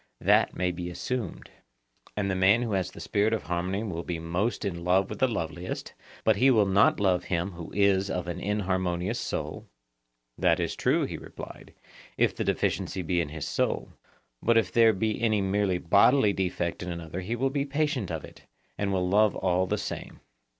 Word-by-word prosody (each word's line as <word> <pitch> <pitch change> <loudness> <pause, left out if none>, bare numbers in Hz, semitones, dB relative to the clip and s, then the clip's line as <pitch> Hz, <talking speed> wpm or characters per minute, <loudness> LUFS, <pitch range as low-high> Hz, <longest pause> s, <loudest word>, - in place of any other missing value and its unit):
That - - +3
may 90 -1 0
be 90 0 -5
assumed. 110 +2 -4 0.7
And 100 -2 0
the - - 0
man 100 +6 +4
who 115 - -3
has 95 -2 0
the - - -12
spirit 105 +2 +1
of 110 - -1
harmony 90 +4 -2
will 85 -6 -3
be 85 0 -4
most 90 +9 -2
in 85 -3 -3
love 95 +2 +2
with - - -6
the 130 - +4
loveliest; 85 -5 -4 0.3
but 110 -2 +3
he 130 +6 +5
will 110 -5 +5
not 95 +1 +4
love 90 -3 +2
him 90 +2 -1
who 85 -2 -9
is 100 -1 +2
of 90 -2 -3
an 90 0 -4
inharmonious 95 0 -1
soul? - - -4 0.7
That - - +3
is - - -1
true, - - +2
he - - -5
replied, - - -10 0.4
if - - +2
the - - -2
deficiency 95 - -1
be 85 +1 +1
in 80 - -3
his 80 -1 -5
soul; - - -1 0.5
but 115 0 +3
if 105 -5 +2
there 115 -1 +6
be 110 +2 -1
any 110 -3 +2
merely 95 -1 +1
bodily 100 +6 +4
defect 90 -3 -2
in 90 - -4
another 85 +1 -5
he 110 +6 -3
will 135 +3 0
be 140 0 0
patient 140 - -1
of 80 -3 -4
it, - - -15 0.4
and 100 -1 0
will 90 -1 0
love 105 +2 +4
all 95 0 +1
the - - 0
same. - - -6
95 Hz, 195 wpm, -27 LUFS, 90-110 Hz, 0.7 s, there